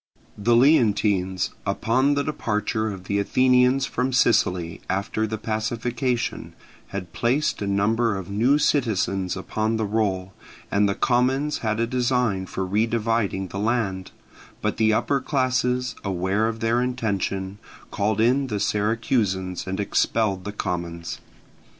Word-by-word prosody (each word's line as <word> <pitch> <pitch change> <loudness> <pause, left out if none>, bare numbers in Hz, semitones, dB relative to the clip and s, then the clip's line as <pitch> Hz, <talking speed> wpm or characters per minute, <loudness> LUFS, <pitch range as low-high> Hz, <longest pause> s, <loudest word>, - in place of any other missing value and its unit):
The 115 +3 +2
Leontines, 105 - +3
upon 125 +8 +1
the 140 - +1
departure 110 -6 -1
of 95 -2 -8
the 100 +2 -1
Athenians 125 +4 +3
from 125 0 -1
Sicily 95 -9 +2
after 100 +3 -1
the 110 +1 -3
pacification, 120 +3 -2 0.3
had 90 -3 -6
placed 130 +4 0
a 100 - -2
number 105 +3 +1
of 95 -2 -6
new 115 +8 +2
citizens 100 -10 0
upon 110 +3 -1
the 110 - -1
roll, 100 -3 -1 0.4
and 100 0 +3
the 100 - -1
commons 130 +4 +1
had 110 -1 -1
a 115 - +2
design 120 -6 0
for 95 +1 -3
redividing 110 -1 0
the 95 - -5
land; 105 -4 -1 0.5
but - - -2
the 110 -1 +3
upper 140 +5 +1
classes, 125 -2 0
aware 95 +3 0
of 115 0 -4
their 115 +2 +2
intention, 100 -5 -2 0.3
called 105 0 0
in 130 +5 +3
the 105 -4 -2
Syracusans 105 -4 0
and 95 +1 -3
expelled 100 -2 0
the 105 - -3
commons. 85 -4 -4
110 Hz, 135 wpm, -24 LUFS, 100-125 Hz, 0.5 s, Leontines